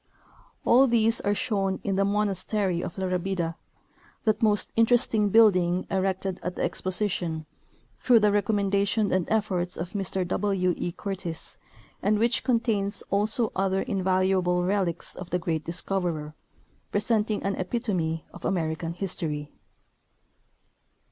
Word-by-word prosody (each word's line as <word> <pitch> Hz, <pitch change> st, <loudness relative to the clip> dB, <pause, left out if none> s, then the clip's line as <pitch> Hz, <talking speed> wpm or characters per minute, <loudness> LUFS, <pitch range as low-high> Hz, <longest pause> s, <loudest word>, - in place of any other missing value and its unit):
All 260 Hz, +3 st, +6 dB
these 230 Hz, -1 st, +2 dB
are 205 Hz, 0 st, +1 dB
shown 195 Hz, -4 st, -1 dB
in 195 Hz, -, -1 dB
the 195 Hz, -, +2 dB
monastery 200 Hz, -2 st, 0 dB
of 170 Hz, -, -6 dB
La 190 Hz, -, -1 dB
Rabida, 180 Hz, -2 st, -1 dB, 0.7 s
that 215 Hz, -2 st, +1 dB
most 210 Hz, -2 st, +2 dB
interesting 225 Hz, -2 st, +3 dB
building 185 Hz, -5 st, +4 dB
erected 190 Hz, 0 st, -1 dB
at 180 Hz, 0 st, -4 dB
the -, -, -2 dB
Exposition 180 Hz, -4 st, -2 dB, 0.5 s
through 245 Hz, -2 st, +5 dB
the 210 Hz, 0 st, +4 dB
recommendation 200 Hz, 0 st, +1 dB
and 185 Hz, -2 st, +1 dB
efforts 190 Hz, -5 st, 0 dB
of 170 Hz, +2 st, -5 dB
Mr 190 Hz, -2 st, -1 dB
W. 185 Hz, -1 st, +1 dB
E. 175 Hz, -, -3 dB
Curtis, 180 Hz, -3 st, -5 dB, 0.4 s
and 210 Hz, +1 st, +2 dB
which 235 Hz, +3 st, +2 dB
contains 225 Hz, -5 st, +1 dB
also 215 Hz, +3 st, +1 dB
other 190 Hz, 0 st, 0 dB
invalu 190 Hz, 0 st, +1 dB
able 180 Hz, 0 st, +1 dB
relics 185 Hz, -3 st, -1 dB
of 180 Hz, -1 st, -8 dB
the 180 Hz, -, +1 dB
great 165 Hz, -3 st, -2 dB
discoverer, 170 Hz, -3 st, -2 dB, 0.6 s
presenting 210 Hz, 0 st, +1 dB
an 195 Hz, -, 0 dB
epitome 185 Hz, -6 st, -2 dB
of -, -, -12 dB
American 165 Hz, -2 st, -1 dB
history. 155 Hz, -5 st, -3 dB
195 Hz, 130 wpm, -26 LUFS, 180-210 Hz, 0.7 s, All